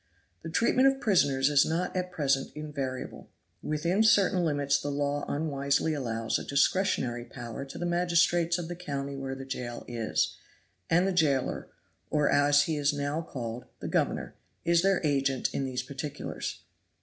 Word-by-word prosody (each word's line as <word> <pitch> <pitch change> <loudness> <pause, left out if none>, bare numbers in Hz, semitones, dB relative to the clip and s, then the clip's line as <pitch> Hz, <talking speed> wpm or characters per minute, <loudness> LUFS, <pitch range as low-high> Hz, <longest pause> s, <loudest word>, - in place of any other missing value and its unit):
The - - -6
treatment 245 +9 +3
of 270 0 +2
prisoners 145 - +3
is 145 -1 +6
not 170 +4 -1
at 180 0 -2
present 135 -5 +1
invariable. 140 -4 -5 0.3
Within 170 +7 0
certain 195 -4 +4
limits 145 -3 +1
the 145 - -3
law 145 0 -1
unwisely 145 0 0
allows 115 -5 -1
a - - -6
discretionary 140 -5 +1
power 120 +2 -7
to 135 - -9
the 175 - -3
magistrates 175 0 +2
of 175 -2 -4
the 175 - -5
county 140 -5 -4
where 135 -1 -4
the 135 0 -8
jail 125 -2 -5
is; 115 -2 -1 0.5
and 175 +3 +4
the 195 - 0
jailer, 145 -7 +1 0.4
or, 150 -1 +2
as 145 0 +5
he 160 0 -1
is 145 0 +2
now 145 +2 -2
called, 120 -6 -6
the - - -5
governor, - - -1 0.3
is 170 0 +4
their 195 0 +2
agent 135 -3 +1
in 135 - -1
these 125 -1 -3
particulars. 140 +2 -5
145 Hz, 160 wpm, -29 LUFS, 135-170 Hz, 0.5 s, is